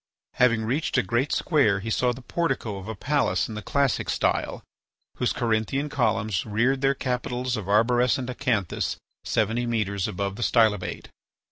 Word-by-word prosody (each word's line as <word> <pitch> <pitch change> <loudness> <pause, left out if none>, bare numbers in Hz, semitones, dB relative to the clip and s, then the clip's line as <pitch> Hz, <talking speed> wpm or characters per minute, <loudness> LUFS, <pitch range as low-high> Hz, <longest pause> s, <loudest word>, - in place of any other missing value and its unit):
Having 115 -3 +4
reached 135 +8 0
a - - +3
great 120 +9 0
square 135 - +2
he 110 +3 -4
saw 125 +3 +2
the 125 +1 -8
portico 135 -9 -2
of 95 - -10
a 110 - -4
palace 145 +7 0
in 110 - -7
the 105 - -5
Classic 140 +4 0
style, - - 0 0.5
whose 125 - +1
Corinthian 120 +4 0
columns 110 -8 0
reared 120 +5 +1
their 135 0 +3
capitals 125 0 -2
of 105 -4 -5
arborescent 120 +4 +3
acanthus 110 -7 -1 0.3
seventy 120 +2 0
metres 100 -4 -1
above 100 +1 -3
the - - -6
stylobate. 110 -5 +1
120 Hz, 155 wpm, -25 LUFS, 105-130 Hz, 0.5 s, Having